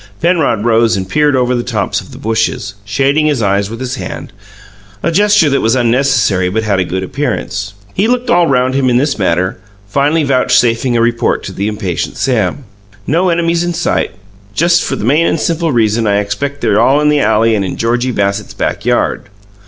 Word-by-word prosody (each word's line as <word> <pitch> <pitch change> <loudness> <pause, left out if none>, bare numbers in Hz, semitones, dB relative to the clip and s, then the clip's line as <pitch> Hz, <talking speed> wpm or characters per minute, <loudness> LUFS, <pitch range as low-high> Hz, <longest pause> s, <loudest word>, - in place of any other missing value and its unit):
Penrod 160 - +1
rose 115 -2 +3
and 95 -1 -4
peered 150 +5 +2
over 125 -1 +1
the 120 - 0
tops 110 -5 -2
of - - -15
the - - -11
bushes, 110 -1 -2
shading 140 +8 +1
his 140 -7 0
eyes 100 0 +1
with 115 +1 -7
his 130 0 -4
hand, 125 -2 -7 0.7
a 170 - +1
gesture 205 -1 +3
that 140 -1 +1
was 115 +3 +2
unnecessary 120 -6 +1
but 110 +4 -1
had 100 -3 0
a - - +2
good 95 +1 -3
appearance. 105 -4 -3 0.2
He 200 +4 +1
looked 250 +1 0
all 175 -4 +3
round 130 -1 +1
about 135 0 0
him 130 - +3
in 120 - +2
this 140 -2 0
manner, 90 0 0 0.3
finally 145 +8 +1
vouchsafing 125 -2 +2
a - - +2
report 120 0 0
to - - -6
the 100 - -2
impatient 105 -5 -3
Sam. 125 +1 -1 0.4
"No 175 +6 +1
enemies 170 0 +1
in 175 -1 -2
sight 175 - 0 0.5
just 170 +4 +3
for - - -2
the - - -4
main 150 +7 +3
and 165 - 0
simple 165 0 0
reason 110 -2 +1
I 100 0 +2
expect 105 +8 -3
they're 110 -2 +2
all 135 +5 +3
in 150 0 +2
the 150 -1 +2
alley 110 -1 +2
and 105 -2 0
in 95 - -4
Georgie 120 +2 0
Bassett's 100 -1 -2
backyard." - - -1
120 Hz, 200 wpm, -13 LUFS, 105-145 Hz, 0.7 s, rose